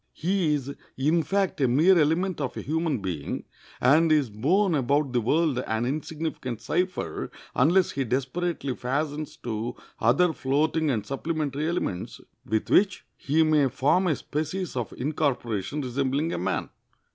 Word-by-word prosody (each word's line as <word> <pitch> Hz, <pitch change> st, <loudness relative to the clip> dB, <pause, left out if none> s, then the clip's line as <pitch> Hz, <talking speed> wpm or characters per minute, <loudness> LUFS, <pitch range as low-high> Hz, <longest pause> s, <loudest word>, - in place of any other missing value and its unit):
He 175 Hz, -3 st, +1 dB
is, 140 Hz, -1 st, -4 dB, 0.2 s
in 155 Hz, +6 st, +2 dB
fact, 195 Hz, -2 st, 0 dB
a 130 Hz, -, +4 dB
mere 155 Hz, +10 st, +5 dB
element 165 Hz, +3 st, +1 dB
of 135 Hz, -, -3 dB
a -, -, -3 dB
human 155 Hz, -, -1 dB
being, 85 Hz, -7 st, -3 dB, 0.4 s
and 155 Hz, +6 st, +4 dB
is 145 Hz, -7 st, +3 dB
borne 170 Hz, -, +2 dB
about 140 Hz, -1 st, +1 dB
the 120 Hz, -, +2 dB
world 150 Hz, +3 st, +2 dB
an 110 Hz, +1 st, 0 dB
insignificant 150 Hz, -3 st, -3 dB
cipher, 185 Hz, 0 st, -2 dB, 0.2 s
unless 170 Hz, +8 st, +3 dB
he 135 Hz, -, -1 dB
desperately 135 Hz, +3 st, -2 dB
fastens 145 Hz, +4 st, -3 dB
to 115 Hz, 0 st, -4 dB, 0.2 s
other 140 Hz, +10 st, +3 dB
floating 155 Hz, +3 st, +1 dB
and 110 Hz, -6 st, -1 dB
supplementary 150 Hz, +1 st, -2 dB
elements, 170 Hz, -, -3 dB, 0.2 s
with 110 Hz, -1 st, -2 dB
which 195 Hz, -1 st, +3 dB
he 155 Hz, +4 st, +2 dB
may 150 Hz, -3 st, +3 dB
form 145 Hz, +9 st, +2 dB
a 160 Hz, -, +2 dB
species 155 Hz, +5 st, -4 dB
of 120 Hz, -3 st, -3 dB
incorporation 135 Hz, -4 st, -1 dB
resembling 140 Hz, +4 st, -1 dB
a -, -, -2 dB
man. 95 Hz, +2 st, -2 dB
145 Hz, 145 wpm, -26 LUFS, 125-160 Hz, 0.4 s, mere